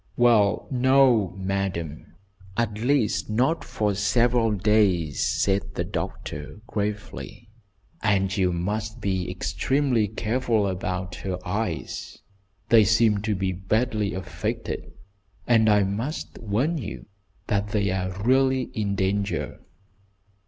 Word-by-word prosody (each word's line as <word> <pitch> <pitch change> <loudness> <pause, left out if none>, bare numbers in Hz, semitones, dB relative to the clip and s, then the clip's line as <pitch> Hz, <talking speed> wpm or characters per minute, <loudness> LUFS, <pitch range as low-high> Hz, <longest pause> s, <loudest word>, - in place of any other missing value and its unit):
"Well, 115 -4 +4
no, 125 -7 +4
madam, 95 -5 -3 0.4
at 110 -3 -1
least 125 -3 +1
not 130 +10 +1
for 110 -4 -1
several 115 +3 +2
days," 100 -7 +2
said 100 0 0
the - - -1
doctor, 75 +7 -5
gravely, 105 +1 -5 0.5
"And 95 -2 +1
you 95 -3 +2
must 105 +6 -3
be 95 -4 -1
extremely 110 +7 0
careful 110 +1 0
about 95 -1 -3
her 95 -2 -3
eyes. 105 +4 -3 0.5
They 115 -2 +7
seem 110 0 +3
to 105 0 -1
be 95 0 -1
badly 105 +2 0
affected, 95 - -4 0.5
and 110 -2 +4
I 105 -1 +5
must 110 +11 -4
warn 125 +10 0
you 105 - -7 0.4
that 100 0 0
they 100 -2 0
are 95 +1 -3
really 130 +1 +2
in 100 -2 -1
danger." 95 -6 -1
105 Hz, 115 wpm, -25 LUFS, 95-115 Hz, 0.5 s, They